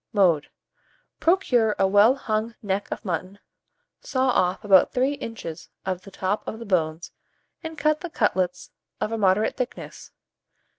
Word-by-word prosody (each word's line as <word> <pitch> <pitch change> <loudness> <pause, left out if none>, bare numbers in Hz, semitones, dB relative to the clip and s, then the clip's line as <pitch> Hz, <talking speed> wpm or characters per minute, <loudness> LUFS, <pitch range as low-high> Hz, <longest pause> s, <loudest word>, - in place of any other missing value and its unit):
Mode. 175 -8 +3 0.7
Procure 250 - +3
a 195 - +3
well 205 +6 +5
hung 225 -3 -2
neck 200 0 -1
of - - -5
mutton, 185 +2 -3 0.6
saw 260 0 0
off 185 -3 +1
about 195 -3 +5
3 260 +2 +2
inches 225 - -7 0.2
of 185 -1 -2
the 195 - -12
top 195 +2 -2
of 220 - -4
the 230 - -8
bones, 165 -4 -1 0.5
and 320 -1 -7
cut 305 +1 +2
the 350 - -5
cutlets 185 - -1 0.3
of 215 - -2
a 225 - -1
moderate 200 +2 +2
thickness. 255 -1 -6
210 Hz, 150 wpm, -24 LUFS, 185-250 Hz, 0.7 s, well